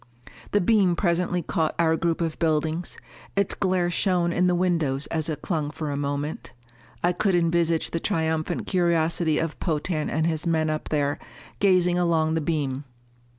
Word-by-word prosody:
The 205 - +2
beam 190 -2 +3
presently 175 -1 0
caught 155 +1 -1
our 160 -1 +3
group 170 0 -1
of 165 -2 -2
buildings; 160 +1 0 0.4
its 200 -1 +1
glare 185 -3 0
shone 175 -1 +1
in 180 +1 +2
the 180 - +2
windows 165 -6 0
as 160 -1 -1
it 150 -2 -4
clung 155 -6 -1
for 150 -1 -4
a - - -2
moment. 145 +1 -3 0.5
I 175 - +4
could 190 +1 +1
envisage 170 -1 +1
the 165 - -1
triumphant 160 -4 -1
curiosity 170 -3 +1
of 165 -1 -2
Potan 155 -1 -1
and 160 +2 0
his 165 0 -1
men 160 -2 +1
up 155 - -4
there, 145 -2 0 0.4
gazing 180 -3 +3
along 160 -2 +2
the 160 - 0
beam. 145 -4 -1
165 Hz, 165 wpm, -25 LUFS, 155-175 Hz, 0.5 s, I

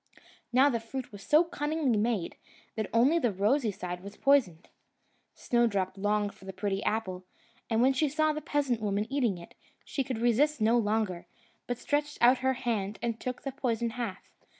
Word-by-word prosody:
Now 260 +3 +5
the 240 -5 +1
fruit 245 +3 -6
was 205 -1 -10
so 305 - +4
cunningly 300 -5 -1
made, 210 -4 0 0.4
that 220 -2 -3
only 265 +9 +4
the 245 -8 +1
rosy 215 +6 +1
side 180 -2 -5
was 200 +2 -10
poisoned. 240 - +2 0.7
Snowdrop 210 -6 +1
longed 205 +1 0
for - - -17
the 190 - -7
pretty 195 +1 -2
apple; 190 -4 -2 0.5
and 225 +1 +2
when 265 +1 +4
she 290 +3 +1
saw 310 +2 +1
the 305 - -4
peasant 275 -7 0
woman 205 0 0
eating 240 -9 +1
it, 170 - -12 0.3
she 275 - -2
could 255 -3 -4
resist 245 +6 +2
no 225 +2 +3
longer, 210 -5 0 0.4
but 245 - -2
stretched 295 +2 -1
out 245 +2 +5
her 260 +1 +1
hand 220 -5 -2
and 230 -1 -2
took 250 -1 -5
the 275 - -3
poisoned 235 -4 -1
half. 230 -5 -5
235 Hz, 180 wpm, -29 LUFS, 205-270 Hz, 0.7 s, Now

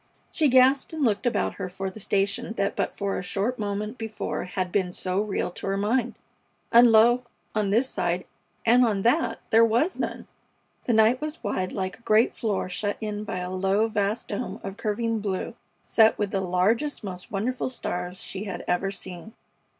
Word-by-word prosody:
She 310 - +2
gasped 260 +3 +4
and 315 -2 -2
looked 220 +2 +1
about 245 - 0
her 185 - -3
for 190 +1 -4
the 215 - -11
station 200 +4 -1
that 200 -1 0
but - - -2
a 200 -1 -1
short 200 +6 -2
moment 210 +3 -3
before 220 -1 -4
had 180 0 -3
been 185 -2 0
so 185 +2 0
real 205 -3 -2
to 180 - -7
her 195 0 0
mind; 235 +4 0 0.6
and, 235 0 +8
lo! 235 +3 +6 0.3
on 210 -2 0
this 230 +6 +3
side 175 -5 -1 0.4
and 240 +2 +6
on 205 -5 +1
that 235 0 +2
there 225 +1 +7
was 235 +11 +2
none! - - -3 0.6
The 240 - +1
night 220 +3 +4
was 305 -1 -5
wide 185 -3 -1
like 185 -2 -4
a - - -25
great 220 +1 +3
floor 215 -6 -1
shut 205 +3 -2
in 210 -1 -4
by 185 - -4
a 180 0 -4
low, 195 +4 +1
vast 210 0 -1
dome 205 - -4
of 195 0 -5
curving 225 +1 -1
blue 200 -3 -3 0.3
set 220 -1 +4
with 205 -2 -1
the 195 - 0
largest, 200 +11 0
most 180 -3 -7
wonderful 245 +6 -1
stars 180 -7 -4
she 195 +2 -4
had 195 - -5
ever 180 +2 +1
seen. 190 +2 -7
210 Hz, 190 wpm, -26 LUFS, 195-230 Hz, 0.6 s, and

